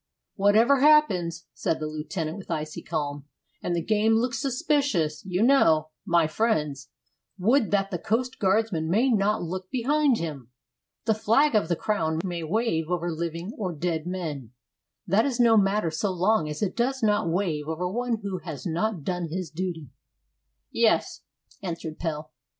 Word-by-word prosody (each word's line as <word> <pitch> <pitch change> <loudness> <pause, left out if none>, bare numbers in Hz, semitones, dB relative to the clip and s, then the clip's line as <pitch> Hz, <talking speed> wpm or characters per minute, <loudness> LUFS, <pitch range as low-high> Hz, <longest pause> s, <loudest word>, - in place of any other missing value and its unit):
"Whatever 220 +7 +4
happens," 190 - +3
said 160 - -1
the 155 - -3
lieutenant, 155 +2 -4
with 195 - -12
icy 155 -2 -4
calm, 145 -1 -4 0.4
"and 175 - -1
the 170 - -1
game 220 +3 +2
looks 235 +1 0
suspicious, 270 - 0
you 185 +3 +1
know, 160 - +4 0.2
my 170 -1 +4
friends, 155 - -1 0.5
would 225 +5 +2
that 195 -1 +1
the 175 - -2
coast 245 +7 -1
guardsman 190 -5 +1
may 235 +9 +3
not 210 -3 +1
look 185 +2 -5
behind 275 +1 +2
him! 145 - -5 0.6
The 220 - +3
flag 230 +7 +3
of 210 -7 +2
the 170 - +1
Crown 200 -7 -1
may 175 -2 -3
wave 165 -2 -1
over 175 -1 -1
living 170 +4 -4
or 185 -5 -3
dead 165 0 -2
men; 150 -10 -5 0.5
that 195 +5 +3
is 255 -3 -2
no 235 -2 +6
matter 195 -4 +2
so 190 +5 -1
long 185 -2 +1
as 150 +6 -4
it 185 - -1
does 255 +2 -1
not 210 -5 +2
wave 165 -4 -1
over 160 +3 -2
one 235 +3 -2
who 195 -2 -3
has 155 -7 -8
not 175 +1 -1
done 180 +1 -2
his 175 -2 -4
duty." 165 -4 -5 0.8
"Yes," - - +1 0.4
answered 165 -4 -5
Pelle. 155 -2 -4
185 Hz, 160 wpm, -26 LUFS, 160-220 Hz, 0.8 s, no